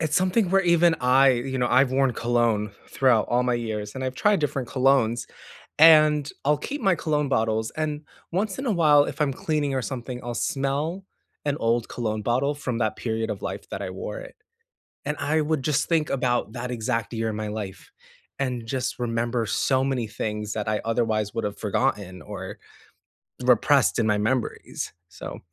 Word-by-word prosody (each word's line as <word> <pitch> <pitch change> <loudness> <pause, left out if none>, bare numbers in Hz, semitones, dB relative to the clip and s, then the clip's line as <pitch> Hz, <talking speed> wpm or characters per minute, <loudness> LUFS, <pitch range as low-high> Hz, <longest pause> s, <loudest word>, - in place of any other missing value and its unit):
it's 155 -2 0
something 185 +1 +2
where 195 0 +4
even 170 -1 +4
I 130 +2 +5
you 130 +2 -2
know, 125 - +1
I've 130 0 +4
worn 135 -1 +2
cologne 115 -4 +1 0.2
throughout 125 -5 +3
all 125 +1 +2
my 125 -1 +1
years, 110 -3 -4
and 130 - -4
I've 130 0 -3
tried 205 +6 +2
different 135 -4 -2
colognes, 130 -3 +2 0.5
and 155 -2 +7 0.2
I'll 150 +1 +3
keep 280 - -5
my 195 -5 +3
cologne 150 -2 -1
bottles, 110 -2 0
and 150 -1 -3 0.3
once 195 +6 -1
in 270 - -4
a 235 - +1
while, 150 -5 +5
if 150 +2 -5
I'm 140 -2 +2
cleaning 145 -1 -1
or 130 - 0
something, 125 -1 -5
I'll 120 0 -4
smell 145 +9 -2 0.4
an 145 0 0
old 115 -1 0
cologne 110 -3 -2
bottle 130 +6 +1
from 125 -4 -3
that 110 -2 0
period 110 -1 -2
of - - -6
life - - -5
that - - -5
I - - -4
wore - - -6
it. - - -11 0.7
And 150 - -1
I 155 +2 +1
would 150 -2 -1
just 145 0 +1
think 160 -3 +1
about 120 -5 0
that 125 +1 -5
exact 115 -1 -2
year 115 -1 -1
in 110 - -4
my 110 0 -3
life 105 -3 -6 0.5
and 125 -4 -2
just 130 +1 -2
remember 120 0 -1
so 130 +5 +1
many 130 -4 -1
things 105 0 -4
that 105 -2 -3
I 105 0 0
otherwise 110 -3 0
would 115 - -1
have 105 -1 -3
forgotten 100 -5 -1
or - - -7 0.9
repressed - - +4
in 110 - +2
my 105 -1 +2
memories. 115 +4 -2 0.2
So, - - -8
130 Hz, 190 wpm, -25 LUFS, 115-150 Hz, 0.9 s, and